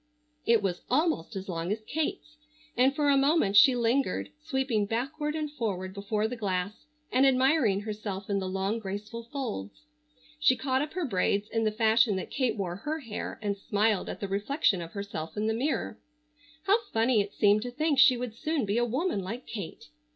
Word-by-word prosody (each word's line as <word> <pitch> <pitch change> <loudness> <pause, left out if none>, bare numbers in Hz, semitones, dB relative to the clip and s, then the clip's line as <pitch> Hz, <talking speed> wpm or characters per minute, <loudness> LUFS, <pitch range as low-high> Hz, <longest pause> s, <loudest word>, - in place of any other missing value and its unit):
It 230 -3 +4
was 180 -3 -1
almost 260 - +1
as 195 0 -5
long 170 0 -3
as 215 +1 -2
Kate's, 305 +1 -3 0.4
and 260 +3 +3
for 295 0 +1
a 280 - +5
moment 275 -7 +3
she 255 +5 +8
lingered, 245 +3 0
sweeping 265 -8 0
backward 290 +7 -2
and 305 -2 -3
forward 190 -8 -3
before 210 +2 -1
the 250 - -5
glass 200 +3 -3 0.2
and 255 +2 +4
admiring 260 -6 +3
herself 205 -2 -5
in 200 -1 0
the 190 -1 -3
long 195 +4 -1
graceful 210 +3 -6
folds. 95 - -5 0.6
She 280 -4 +5
caught 260 0 0
up 300 +1 -4
her 360 -2 -1
braids 200 -2 0
in 225 -1 0
the 215 - +2
fashion 220 0 +3
that 190 - -5
Kate 250 -5 0
wore 180 -3 -3
her 305 +9 -4
hair 230 -5 -5
and 205 -1 0
smiled 205 0 0
at - - -6
the 200 - -2
reflection 200 - +1
of 165 0 -8
herself 200 -4 -6
in 210 - 0
the 220 - +1
mirror. 265 +7 -2 0.6
How 400 +6 +4
funny 225 0 +3
it 200 0 -6
seemed 210 0 +4
to 245 - -4
think 300 +2 +1
she 255 - +7
would 245 -2 -4
soon 305 0 -1
be 205 +3 +1
a 240 - +2
woman 265 - -1
like 225 +7 -6
Kate. 195 - -7
225 Hz, 195 wpm, -28 LUFS, 200-270 Hz, 0.6 s, she